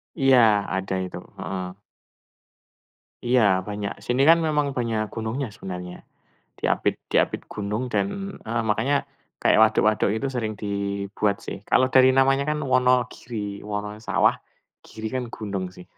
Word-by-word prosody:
Iya, 135 -4 +4 0.4
ada 95 0 -2
itu, 90 - -6 0.2
heeh. 90 -1 -5 1.5
Iya, 125 +1 +3 0.3
banyak. 105 -1 -3
Sini 125 +2 +1
kan 165 - +8
memang 150 -2 +1
banyak 115 -3 0
gunungnya 115 +4 -3
sebenarnya. 90 -1 -7 0.6
Diapit - - +1 0.2
diapit - - +2
gunung 105 +2 -3
dan 100 -2 +2 0.4
heeh, 115 +1 -2
makanya 135 +7 +1 0.5
kayak - - +4
waduk 110 0 +4
waduk 105 -1 +1
itu 135 - -2
sering 110 -3 -2
dibuat 100 0 -1
sih. - - -4
Kalau 130 - +5
dari 130 0 +7
namanya 135 +1 +4
kan 150 - -1
Wonogiri, 125 -5 0
Wononya 105 +1 -4
sawah, - - +4 0.5
Giri 110 0 -8
kan 130 -1 -1
gunung 100 -3 -4
sih. 90 - -11
110 Hz, 135 wpm, -24 LUFS, 100-125 Hz, 1.5 s, kan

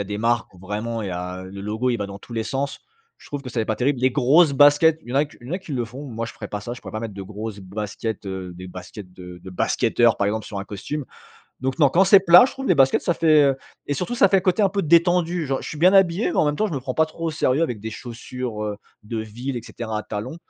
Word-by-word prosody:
a - - -8
des 105 +1 -5
marques 115 +1 0
où 90 - -18
vraiment, 105 +5 -4
il 100 - -4
y - - -4
a 90 +1 -5
le 100 +1 -9
logo, 110 +5 -1
il 120 - 0
va 105 - -3
dans 100 0 -9
tous 120 - -13
les 115 - -1
sens. 135 +4 -3 0.4
Je - - -18
trouve 145 - -5
que 130 - -7
ça 120 - -4
fait - - 0
pas 110 - -1
terrible. 130 0 0
Les 130 +1 +3
grosses 145 +4 +4
baskets 145 +3 +5
il - - -16
y - - -4
en - - 0
a 145 - +4
q 145 - -16
il 120 - -12
y - - -8
en - - -1
a - - -2
qui 175 -6 -9
le 120 -3 -1
font 125 +6 -9
moi 115 -4 -4
je 115 - -7
ferai 105 - -8
pas 105 0 -5
ça 120 +4 -6
je 125 - -8
pourrais - - -10
pas 110 - -4
mettre 110 -3 -6
de 100 - -6
grosses 105 +2 -7
baskets, 105 +2 -5
heu, 95 -2 -5
des 90 +1 -9
baskets 90 +1 -10
de 90 -1 -11
de 95 - -9
basketteurs 115 +5 +2
par 100 - +1
exemple 110 +1 -3
sur 100 - -6
un - - -6
costume. 105 +10 -5 0.6
Donc 130 +2 -2
non, 145 -4 +6
quand 175 +8 +4
c'est 195 +1 +7
plat 180 +2 +8
je 260 - -1
trouve 270 0 -6
les - - +5
baskets 135 -1 +4
ça 175 - 0
fait, 155 -3 +5
heu 135 -1 +2 0.3
et 145 - -1
surtout 180 - -3
ça 200 -5 +5
fait 190 -1 +3
côté 185 +2 +2
un 200 - +5
peu 200 +1 -1
détendu, 170 +1 +3
genre, 135 0 -2
je - - -6
suis 155 - -7
bien 180 +5 +5
habillé 190 +2 +4
mais - - -4
en - - +4
même 150 0 0
temps 215 - +1
je 175 - -4
me 135 - -2
prends 130 0 -4
pas 160 +4 +2
trop 165 +1 -8
au - - -1
sérieux 150 -1 +1
avec 120 -9 -2
des 110 +2 -5
chaussures, 120 -1 -6
heu, 105 -1 -3 0.3
de 110 +2 -5
ville 120 +5 -5
et 120 - -4
cetera 115 -2 -6
à - - -4
talons. 110 +8 -5
125 Hz, 315 wpm, -23 LUFS, 105-155 Hz, 0.6 s, plat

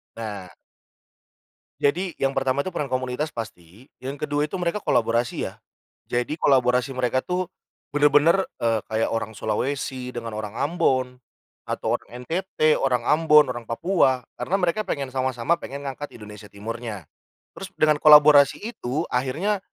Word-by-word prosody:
Nah. 105 -5 -6 1.3
Jadi 175 +5 0
yang 135 0 +1
pertama 135 +1 0
itu 185 - -4
peran 145 - -3
komunitas 130 +4 -2
pasti. 100 +1 -9
Yang 140 +3 -4
kedua 145 0 0
itu - - -5
mereka 175 +4 -1
kolaborasi 115 +1 +1
ya. - - -9 0.6
Jadi 120 +5 -1
kolaborasi 125 -3 +2
mereka 130 0 0
tuh 180 0 -2 0.5
bener-bener, 145 +5 +4 0.2
eee, 115 -2 +1
kayak 110 0 0
orang 115 -1 -2
Sulawesi 130 +3 -2
dengan 115 -3 -6
orang 110 0 -5
Ambon, 130 -5 0 0.4
atau - - -2
orang - - -10 0.2
NTT, 165 -2 +1
orang 125 -3 0
Ambon, 150 0 +5
orang 120 -2 -5
Papua. 130 -2 +1
Karena 190 - -2
mereka 180 +3 +1
pengen 140 -8 -3
sama-sama 130 +3 0
pengen 140 +1 -7
ngangkat 140 +2 -6
Indonesia 105 -1 -11
Timurnya. 110 -2 -6 0.5
Terus 195 - -7
dengan 155 -1 +4
kolaborasi 150 -2 +7
itu 160 - -3
akhirnya 150 +12 0
130 Hz, 140 wpm, -24 LUFS, 120-150 Hz, 1.3 s, kolaborasi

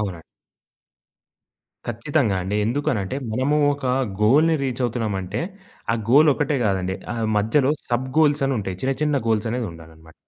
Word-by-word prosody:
అవునండి. 95 -6 -4 1.7
ఖచ్చితంగా 120 -2 0
అండి. 100 +3 -2
ఎందుకనంటే 120 -4 -1 0.2
మనము 135 +5 +1 0.2
ఒక 140 -2 -5 0.4
గోల్‌ని 155 +8 +4
రీచవుతున్నామంటే 115 -6 -2 0.5
ఆ - - +2 0.2
గోలొక్కటే 145 0 +4
కాదండి. 95 -1 -1 0.2
ఆ - - -5 0.2
మధ్యలో 130 +7 +2 0.2
సబ్ 125 +2 0
గోల్స్ 145 -2 +3
అని 135 - 0
ఉంటాయి. 95 -2 -5
చిన్న 135 +1 +1
చిన్న 150 -1 +1
గోల్స్ 110 0 +1
అనేదుండాలనమాట. 80 -8 -7
120 Hz, 125 wpm, -22 LUFS, 100-140 Hz, 1.7 s, గోల్‌ని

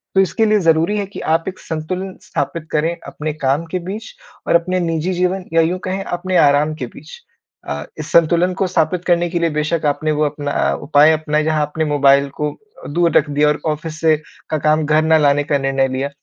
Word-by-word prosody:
तो 190 - +6
इसके 195 +4 +1
लिए 215 -1 +3
ज़रूरी 165 +4 +2
है 205 - -1
कि 195 - -10
आप 165 +1 +2
एक 185 - -5
संतुलन 180 +4 -5
स्थापित 155 +3 -4
करें 160 +3 0
अपने 155 0 -4
काम 145 +2 -1
के 185 - -1
बीच 200 +6 -7 0.4
और - - +3
अपने 185 +2 +1
निजी 165 +1 -1
जीवन 180 +1 -1
या 165 - +5
यूँ 175 +3 0
कहें, 190 +1 -3
अपने 180 0 -2
आराम 145 +2 +4
के 130 -5 -5
बीच। 150 +6 -12 0.5
अ, 70 +1 -4 0.2
इस 155 +1 -6
संतुलन 170 +2 +3
को 195 - +1
स्थापित 175 0 0
करने 175 -1 +2
के 170 0 -1
लिए 170 -1 +1
बेशक 150 +1 -1
आपने 155 +2 0
वो 150 0 +1
अपना 145 -1 -1
उपाय 150 +1 +5
अपनाए, 155 -1 0
जहाँ 155 -1 +1
आपने 155 +2 -1
मोबाइल 140 -1 +3
को 150 0 0
अ, 430 0 -16
दूर 170 +2 +1
रख 150 - +1
दिया 145 +1 +2
और 150 - +1
ऑफ़िस 155 0 -4
से 160 -1 +4 0.3
का 155 - 0
काम 155 +1 +1
घर 155 +1 +3
ना 160 0 +4
लाने 145 -1 +3
का 145 0 0
निर्णय 135 -1 +1
लिया। 135 +2 -3
155 Hz, 220 wpm, -18 LUFS, 150-175 Hz, 0.5 s, तो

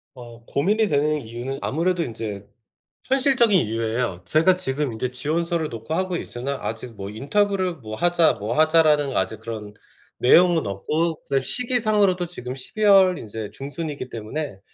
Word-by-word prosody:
어 120 -2 -12
고민이 205 - +1
되는 150 -1 +1
이유는 120 +3 -6
아무래도 170 +4 0
인제 105 -5 -6 0.6
현실적인 260 - +4
이유예요. 115 -3 -2
제가 165 +4 +3
지금 145 -6 -2
인제 120 +3 -3
지원서를 160 +4 -1
넣고 115 +4 -6
하고 185 +1 -1
있으나 135 +1 -4
아직 115 +1 -5
뭐 100 0 -7
"인터뷰를 185 - 0
뭐 110 -7 -8
하자, 175 +3 +3
뭐 105 +7 -4
하자."라는 155 -3 +3
아직 100 +3 -1
그런 110 -2 -7 0.4
내용은 170 +5 +4
없고 155 - -2
그다음에 135 -1 0
시기상으로도 215 - +3
지금 130 -7 -6
12 135 +11 -5
월 190 -4 +5
인제 110 -1 -7
중순이기 145 -1 -6
때문에 115 0 -5
145 Hz, 350 characters per minute, -23 LUFS, 115-175 Hz, 0.6 s, 월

